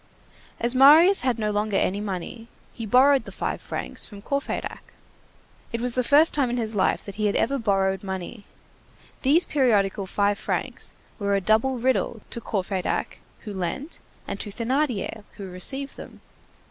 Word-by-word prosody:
As 235 +1 +1
Marius 310 +9 +7
had 250 -2 0
no 215 -1 -1
longer 210 -1 0
any 200 +2 0
money, 210 +3 -5 0.3
he 225 -2 -6
borrowed 265 +4 +5
the - - -8
five - - -3
francs - - -5
from 200 -2 -12
Courfeyrac. 280 0 -4 0.8
It 230 - -2
was 245 0 +1
the 255 - +1
first 295 +6 +5
time 275 -4 +1
in 245 - -2
his 225 -2 -1
life 190 - +1
that 200 -1 -8
he 215 -1 +1
had 200 - 0
ever 275 +3 +1
borrowed 195 -3 +1
money. 190 +2 -6 0.8
These 305 +7 +4
periodical 205 -8 +1
five 205 +1 0
francs - - -3 0.2
were 200 -1 +1
a - - +2
double 220 +7 +2
riddle 240 -2 0
to 235 - -4
Courfeyrac 190 -3 -2 0.2
who 210 - -7
lent 195 - -4 0.3
and 200 - -5
to 210 - -5
Thénardier 230 -2 -2
who 195 -2 -7
received 270 +10 0
them. - - -11
225 Hz, 165 wpm, -24 LUFS, 200-260 Hz, 0.8 s, Marius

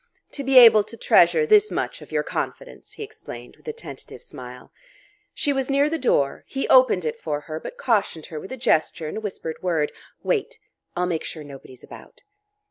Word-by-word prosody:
"To 280 - -5
be 270 0 +3
able 225 -4 +9
to 230 - -10
treasure 460 - +4
this 425 -1 +5
much - - -3
of - - -13
your - - 0
confidence," - - -6
he - - -7
explained 440 +1 -11
with - - -24
a - - -1
tentative 470 +1 -10
smile. 485 - -11 0.6
She 290 -2 0
was 270 -1 -2
near 280 +2 +2
the 325 - -1
door; 140 - +1
he 270 - -3
opened 255 -9 +5
it 155 - -3
for 150 -2 -3
her, 155 +2 -6
but - - -9
cautioned 205 - 0
her 155 -4 -7
with 190 - -10
a 260 - -5
gesture 160 -8 0
and 155 - -5
a - - -4
whispered 185 -6 -6
word: 165 -5 0 0.3
"Wait. 465 +2 -1 0.4
I'll 180 +1 0
make 170 -3 -2
sure 155 - -6
nobody's 135 -3 -13
about." - - -14
230 Hz, 200 wpm, -23 LUFS, -, 0.6 s, able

